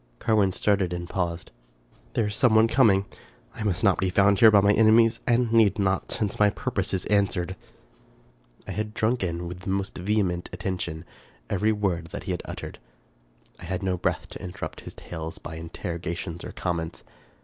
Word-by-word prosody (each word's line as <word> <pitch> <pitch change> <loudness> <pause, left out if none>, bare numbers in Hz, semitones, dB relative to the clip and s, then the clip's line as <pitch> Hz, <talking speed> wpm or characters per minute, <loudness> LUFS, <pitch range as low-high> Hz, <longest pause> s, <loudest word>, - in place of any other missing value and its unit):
Carwin 105 -4 +2
started 95 -2 +1
and 85 0 -4
paused. 85 -2 -3 0.3
" - - -32
There 115 - +1
is 105 0 -3
some 115 -1 +3
one 110 +1 +6
coming. 110 -6 +4 0.5
I - - -9
must 100 -3 -1
not 100 -3 +4
be 95 - +1
found 100 +1 +4
here 115 - +9
by 105 -2 +6
my 100 +1 +4
enemies, 115 +1 +5
and 120 -1 +2
need 110 -4 +5
not, 95 -2 0
since 105 -2 -2
my 105 0 +6
purpose - - -3
is 95 - -2
answered." 100 -3 +1 1.1
I - - -4
had 105 0 -4
drunk 115 0 +1
in, 85 -1 -3
with 90 +1 -7
the 95 +2 -6
most 95 0 -2
vehement 90 -2 0
attention, 90 -3 -4 0.5
every 105 +3 +2
word 95 -6 -1
that - - -7
he - - -3
had - - -2
uttered. - - -7 0.8
I - - -9
had 90 +2 -3
no 95 -1 0
breath 90 - -2
to - - -9
interrupt 90 - -6
his - - -10
tale 80 -1 -6
by 80 +1 -7
interrogations 85 +1 -5
or - - -6
comments. 85 -2 -4
95 Hz, 185 wpm, -26 LUFS, 90-105 Hz, 1.1 s, here